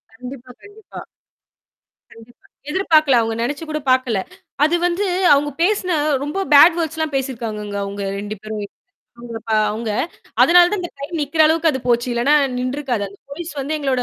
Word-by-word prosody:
கண்டிப்பா, 250 +1 -10
கண்டிப்பா. 410 0 -12 1.1
கண்டிப்பா, 230 +1 -18 0.2
எதிர்பார்க்கல. 310 -6 +3
அவங்க 225 0 -2
நெனைச்சி 285 +6 -3
கூட 305 0 -2
பாக்கல. 255 -5 +1 0.5
அது 320 +3 +3
வந்து 355 +4 -1 0.3
அவங்க 290 +1 +2
பேசின 375 -2 +1 0.3
ரொம்ப 300 +7 -3
பேட் 325 +4 +8
வேர்ட்ஸ் 320 -1 -2
எல்லாம் 315 -2 -2
பேசியிருக்கிறாங்கங்க 225 -6 -4
அவங்க 200 0 -5 0.2
2 210 +1 -5
பேரும் 215 -1 -5 1.1
அவங்க. 220 +1 -4 0.5
அதனால 350 0 +7
தான் 415 - -1
அந்த 350 - -6
ட்ரெயின் 290 +5 -6
நிக்கிற 290 +3 -2
அளவுக்கு 320 0 +2
அது 265 - -3
போச்சு. 240 +1 +2
இல்லன்னா, 240 +5 +2 0.2
நின்றுருக்காது. 255 -3 -2
அந்த 200 +1 -17
போலீஸ் 330 +4 -7
வந்து 285 +3 -3
எங்களோட 265 -3 0
280 Hz, 150 wpm, -19 LUFS, 235-320 Hz, 1.1 s, பேட்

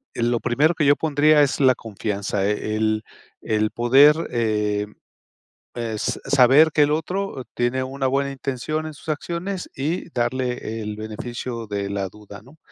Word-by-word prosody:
lo 120 0 0
primero 145 +8 +2
que 155 - +1
yo 145 +1 +6
pondría, 150 0 +4
es 140 +1 0
la 130 -2 +5
confianza. 100 -2 -3
El 110 +1 0 0.4
el 110 -1 0
poder, 135 +6 +5
eh, 105 -3 0 0.9
es 115 -3 -2
s - - -10
saber 140 +4 +5
que 150 - +3
el 145 0 +4
otro 165 -2 -2
tiene 120 +2 0
una 135 0 -2
buena 140 +1 0
intención 135 +4 -3
en 155 - -7
sus - - -16
acciones, 175 +5 -4
y 160 +6 -3
darle 120 -2 -2
el 105 0 -5
beneficio 115 +1 -6
de 100 -1 -3
la 100 -2 -2
duda, 105 0 -13
¿no? 140 +6 -18
125 Hz, 155 wpm, -22 LUFS, 110-145 Hz, 0.9 s, yo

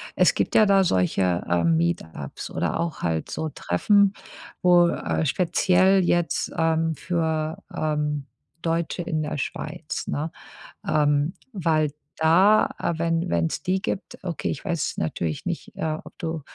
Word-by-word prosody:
Es - - +4
gibt - - 0
ja 215 - +7
da 195 -1 +5
solche, 90 - +1
äh, 85 -1 +2
Meetups 80 -3 -1
oder - - -1
auch 170 -1 -3
halt 80 -1 -1
so 160 - -3
Treffen, 195 - +2 0.5
wo, 175 -2 +6
äh 160 - -1
speziell 185 +4 +3
jetzt, 175 -2 0
ähm, 160 0 +1
für, 160 -2 -1 0.2
ähm, 150 -2 -1 0.4
Deutsche 165 +1 -1
in 160 -3 -2
der 150 0 -3
Schweiz, 135 - -5
ne? 155 +3 -2 0.6
Ähm, 145 +2 +2 0.2
weil 155 -6 +1 0.3
da 185 +7 +5 0.3
wenn 165 0 0
wenn 85 -1 +1
es - - -5
die 185 +1 0
gibt 190 - -4
okay, 175 -4 -3
ich 140 - -4
weiß 170 -5 -1
jetzt - - -30
natürlich 80 0 -2
nicht, - - -5
äh, 155 -1 -2
ob - - -13
du, 165 -2 -4
160 Hz, 150 wpm, -24 LUFS, 145-175 Hz, 0.6 s, ja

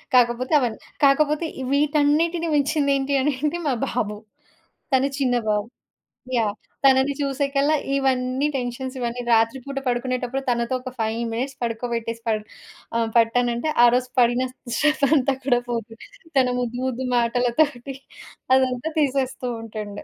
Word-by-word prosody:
కాకపోతే 245 +3 +3
అవన్నీ 240 -5 -2 0.3
కాకపోతే 300 +3 +3 0.3
వీటన్నిటిని 300 +4 +2
మించింది 285 0 +2
ఏంటి 275 +1 -2
అని 290 +2 +1
అంటే, 305 +3 0
మా 275 - +2
బాబు. 210 -3 -2 0.8
తను 265 +1 +4
చిన్న 255 -3 +2
బాబు. 210 +1 0 0.7
యాహ్! 215 -3 +1 0.3
తనని 265 +1 +5
చూసేకల్లా 280 +1 +1 0.2
ఇవన్నీ 260 0 +1
టెన్షన్స్ 255 +1 -4
ఇవన్నీ 240 0 -3
రాత్రి 225 +2 +3
పూట 275 -1 -6
పడుకునేటప్పుడు 250 +1 -1
తనతో 235 +1 0
ఒక 255 0 -7
5 220 0 -1 0.2
మినిట్స్ 260 +4 -3
పడుకోబెట్టేసి 230 -1 -3
పడ్ 215 -1 0 0.5
ఆహ్, 230 -1 0
పట్టానంటే. 240 +3 +2
ఆరోజు 245 +1 +4
పడిన 240 +1 +3 0.3
శ్రమ 305 0 +2
అంతా 275 -1 +2
కూడా 245 -3 +3
పోతుంది. 230 -1 -5 0.3
తన 260 -1 +5
ముద్దు 245 0 -3
ముద్దు 260 0 -2
మాటలతోటి. 245 +3 +1 0.6
అదంతా 260 +2 +1
తీసేస్తూ 265 -3 0
ఉంటుండు. 215 -2 -7
255 Hz, 130 wpm, -23 LUFS, 235-275 Hz, 0.8 s, తనని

